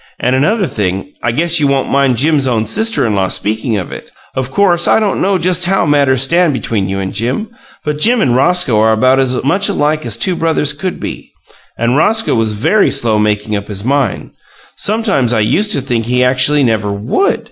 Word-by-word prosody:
And 125 +1 0
another 195 - +1
thing 95 - -3
I 115 - 0
guess 170 +6 +2
you 145 - +2
won't 140 -1 -1
mind 135 -3 +2
Jim's 145 0 +2
own 115 -3 0
sister 220 - +1
in 110 - 0
law 95 -2 0
speaking 110 +3 -2
of 90 - -5
it. - - -9 0.2
Of 130 -1 -3
course, 175 +2 +2
I - - +4
don't 210 -3 -1
know 195 0 +1
just 180 0 +1
how 190 0 +1
matters 140 -4 +2
stand 170 +3 +2
between 105 -5 -2
you 95 - -3
and 95 -1 -4
Jim, 130 - -2 0.3
but 150 0 -3
Jim 240 +8 +3
and 125 - +1
Roscoe 135 -4 +2
are 110 +1 +3
about 130 +4 +2
as 130 -1 0
much 195 +9 +1
alike 155 -4 0
as - - -2
two 185 -2 +1
brothers 160 -3 0
can 180 +5 -5
be, - - -7 0.5
and 120 +3 0
Roscoe 220 +7 +1
was 115 -2 0
very 165 - +2
slow 115 -6 +1
making 105 0 -1
up 100 0 -5
his 100 -2 -5
mind; 135 -4 -1 0.4
sometimes 200 - 0
I 110 - +1
used 200 - +1
to 140 - 0
think 120 -4 -2
he 125 +1 +1
actually 130 +3 +2
never 110 -4 0
WOULD. 110 - -1
135 Hz, 210 wpm, -13 LUFS, 110-170 Hz, 0.5 s, I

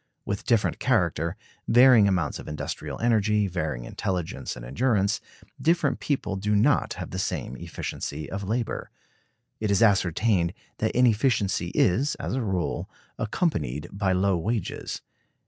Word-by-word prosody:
With 100 -1 -4
different 115 -3 +2
character, - - +1 0.3
varying 120 -3 +7
amounts 90 -7 0
of - - -9
industrial 75 -1 -5
energy, 105 -3 +3
varying 80 -9 -3
intelligence, 90 -4 -3
and - - -9
endurance, 105 - +1 0.4
different 160 -3 +2
people 120 -9 -1
do 105 +2 0
not 125 +7 +3
have - - -7
the - - -3
same 65 - -2
efficiency 75 +4 -5
of 100 +6 -5
labor. 115 +3 -2 0.7
It 110 - -1
is 100 +3 +4
ascertained 95 -2 +2 0.2
that 110 +2 0
inefficiency 115 -6 +2
is, 130 +11 +3
as - - -4
a 130 - 0
rule, 95 -6 -2 0.3
accompanied 80 - -1
by 100 -1 0
low 95 -1 +2
wages. 110 +5 -3
100 Hz, 135 wpm, -26 LUFS, 90-115 Hz, 0.7 s, varying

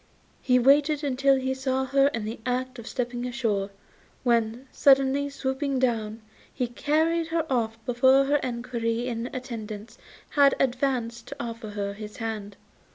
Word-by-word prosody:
He 250 -1 +3
waited 280 +1 +3
till 275 0 +5
he 265 0 -1
saw 265 0 -1
her 275 +1 +4
in 230 -7 -2
the 220 +2 -5
act 255 +1 -2
of 230 - -9
stepping 245 -1 -3
ashore, 220 -6 -1 0.5
when, 235 +1 +1
suddenly 275 +1 +4
swooping 275 0 -2
down, 225 -3 -1 0.3
he 255 - -1
carried 315 +7 +1
her 330 0 0
off 225 -2 0
before 260 +2 +4
her 290 +1 +2
equerry 235 -1 -2
in 235 -1 -3
attendance 225 -4 -7 0.3
had 280 -1 +5
advanced 245 -3 -1
to - - -7
offer 230 -2 -5
her 200 -1 -3
his 210 0 -9
hand. 215 -3 -5
250 Hz, 150 wpm, -26 LUFS, 230-270 Hz, 0.5 s, till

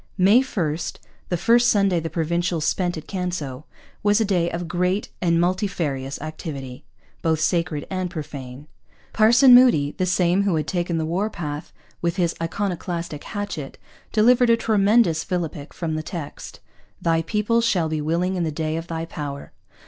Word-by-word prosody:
May 200 +6 +6
1, 170 - -2 0.5
the 175 - 0
first 235 +6 +4
Sunday 200 -4 +3
the 165 0 -4
Provincials 170 0 -1
spent 175 -2 0
at 155 - -8
Canso, 175 -7 -4 0.4
was 205 +1 +3
a 220 - +2
day 180 -4 +1
of 170 0 -4
great 180 +4 0
and 170 -2 +2
multifarious 170 -7 -1
activity, 140 -5 -7 0.4
both 160 -1 +1
sacred 165 -2 0
and 185 -1 -2
profane. 140 -4 -7 0.5
Parson 240 +4 +6
Moody, 240 - +6
the 185 - +1
same 180 +1 +2
who 200 -4 +1
had 155 -2 -1
taken 175 -1 -1
the 160 - -1
war 185 +7 -1
path 155 -4 -6 0.3
with 170 0 0
his 175 -3 +1
iconoclastic 170 -3 -3
hatchet, 205 -10 -5 0.3
delivered 240 +3 +4
a 230 - +5
tremendous 205 -6 +3
philippic 165 -5 -4
from 165 -2 -4
the 155 - -2
text, 155 -2 -8 0.4
'Thy 165 -1 +1
people 210 +6 +1
shall 185 -8 +1
be 155 -1 -2
willing 170 +5 0
in 180 - -1
the 160 - -1
day 155 +1 -2
of 165 +1 -6
Thy 165 -1 -3
power.' 145 -4 -6
170 Hz, 165 wpm, -23 LUFS, 155-195 Hz, 0.5 s, May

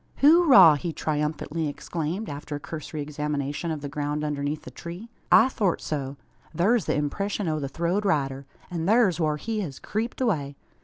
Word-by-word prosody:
"Hooraw!" 285 - +7
he 170 +3 -3
triumphantly 155 +1 -2
exclaimed, 165 +7 -4
after 145 +1 -6
a - - -4
cursory 155 0 -6
examination 150 +1 -3
of 155 -2 -3
the 145 - -4
ground 150 +1 -3
underneath 145 0 -2
the - - -9
tree. 175 +7 -8 0.2
"I 230 - +7
thort 205 -9 0
so. 140 -2 -4 0.4
Thur's 205 +2 +3
the - - 0
impreshun 195 +7 -2
o' 155 -1 0
the 140 -2 -4
throwed 170 +7 -1
rider. 140 -7 0 0.2
An' 165 -1 -2
thur's 205 -5 +4
whar 155 -2 +1
he 220 +6 -3
hez 155 -10 -4
creeped 225 +3 -4
away. 150 - 0
155 Hz, 170 wpm, -26 LUFS, 145-200 Hz, 0.4 s, Hooraw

